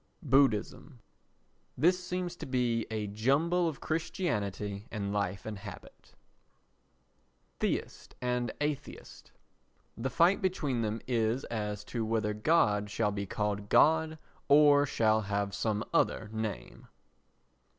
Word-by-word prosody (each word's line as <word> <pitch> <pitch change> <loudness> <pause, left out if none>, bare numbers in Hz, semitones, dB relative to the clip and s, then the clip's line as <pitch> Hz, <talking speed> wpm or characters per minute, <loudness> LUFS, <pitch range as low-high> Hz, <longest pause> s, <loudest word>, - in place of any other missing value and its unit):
Buddhism 135 -1 +1 0.8
This 180 +6 +3
seems 180 -1 -3
to - - -7
be 120 -3 0
a 110 -1 -2
jumble 140 - +1
of 155 -4 -4
Christianity 105 - -2
and 100 -2 -3
Life 100 -2 -2
and 110 -2 -5
Habit. 100 -5 -12 1.4
Theist - - -3
and 125 -2 -1
Atheist 150 -1 -5 0.6
The 130 +3 -3
fight 170 +8 +3
between 150 -10 0
them 110 0 -2
is 115 +1 0
as 105 -2 -3
to 115 +2 -3
whether 110 -1 0
God 105 -4 +2
shall 105 0 0
be 100 -1 -4
called 105 0 -2
God 160 0 +4 0.3
or 145 0 +6
shall 110 -3 +2
have 100 0 -2
some 110 -1 -1
other 110 - +1
name. 110 -1 -5
115 Hz, 120 wpm, -31 LUFS, 105-145 Hz, 1.4 s, or